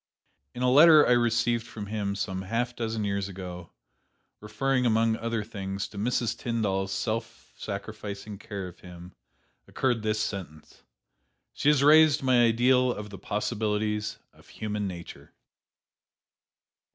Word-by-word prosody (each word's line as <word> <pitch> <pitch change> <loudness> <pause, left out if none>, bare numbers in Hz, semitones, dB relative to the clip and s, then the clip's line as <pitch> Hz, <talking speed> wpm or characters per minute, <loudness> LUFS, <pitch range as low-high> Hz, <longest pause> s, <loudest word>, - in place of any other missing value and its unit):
In 125 - -3
a 125 - +3
letter 155 +2 +8
I - - +3
received 120 -1 +2
from 105 -2 -7
him 100 -1 -3
some 95 -1 -3
half 115 +5 -2
dozen 110 -2 -3
years 100 -1 -2
ago, 90 -2 -8 0.7
referring, 125 +5 -1
among 115 -1 +2
other 115 -1 -2
things, 100 -3 -5
to 100 - -12
Mrs. 120 +1 0
Tyndall's 100 -5 -2
self 115 +3 -4
sacrificing 105 0 -7
care 100 -2 -6
of 90 - -13
him, 90 0 -12 0.5
occurred 125 -4 0
this 110 0 -1
sentence: 90 -7 -6 0.7
'She 145 - +1
has 145 -2 +3
raised 155 -1 +6
my 125 -2 +4
ideal 125 +2 +3
of 105 -2 -7
the 100 - -9
possibilities 105 0 -2 0.2
of - - -21
human 105 -1 -4
nature.'" 85 -2 -9
110 Hz, 135 wpm, -27 LUFS, 100-120 Hz, 0.7 s, letter